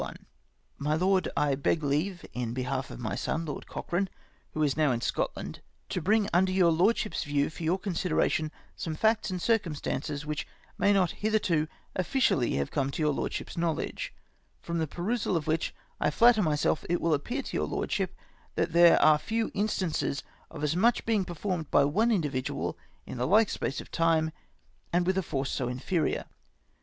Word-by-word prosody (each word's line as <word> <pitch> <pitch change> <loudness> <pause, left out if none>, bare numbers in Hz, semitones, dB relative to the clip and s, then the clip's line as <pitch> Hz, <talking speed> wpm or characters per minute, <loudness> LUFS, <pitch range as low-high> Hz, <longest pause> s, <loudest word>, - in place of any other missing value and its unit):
jNIy 150 +2 0
Lord, 185 +1 +2
— - - -10
I 140 - +2
beg 145 +3 0
leave, 160 +6 -1
in 120 -1 -3
behalf 130 +1 -2
of - - -8
my 110 -5 -3
son, 165 +10 -2
Lord 150 - -6
Cochrane, 185 +2 -2 0.5
who 155 - +1
is 140 -3 +2
now 155 -3 +3
in 120 - 0
Scotland, - - -3 0.3
to 180 - -2
bring 210 +4 +3
under 185 +2 +4
your 185 -3 +4
Lord 180 +8 +3
ship's 215 - -2
view, 145 0 0
for 165 - -10
j^our 170 +4 +1
consideration, 170 -5 0 0.2
some 160 -2 -4
facts 220 +5 +2
and 185 -1 -2
circum 210 -6 +1
stances 145 +1 -3
which 150 0 -3 0.3
may 200 - +3
not 190 -4 +3
hitherto 200 -8 +1 0.3
officially 185 - +2
have 70 0 -1
come 135 -1 0
to 145 +3 -2
your 150 -1 +3
Lordship's - - -3
knowledge, 165 -2 -2 0.5
from 170 0 -3
the 160 - 0
perusal 190 - -1
of 155 - -3
which 160 +1 0 0.3
I - - +2
flatter 230 +7 +5
myself 150 -3 +1
it 175 - +2
will 165 -1 +2
appear 245 - -1
to - - -6
your - - 0
Lordship - - -2 0.4
that 165 - 0
there 170 0 +7
are 155 -1 +6
few 225 +6 -1
instances 185 -9 -1 0.3
of 150 -2 -7
as 150 +2 +1
much 230 +6 +3
being 215 -4 +2
performed 175 -2 -3
by 140 - +5
one 215 +12 +2
individual 145 - -1 0.3
in 125 - -7
the 125 - +1
like 210 +4 +5
space 135 - -2
of - - -10
time, 165 -1 +2 0.6
and 175 +1 +2
with 185 +1 +2
a 190 - +2
force 135 -5 -2
so 130 - -1
inferior. 135 +7 -1
165 Hz, 185 wpm, -29 LUFS, 145-190 Hz, 0.6 s, there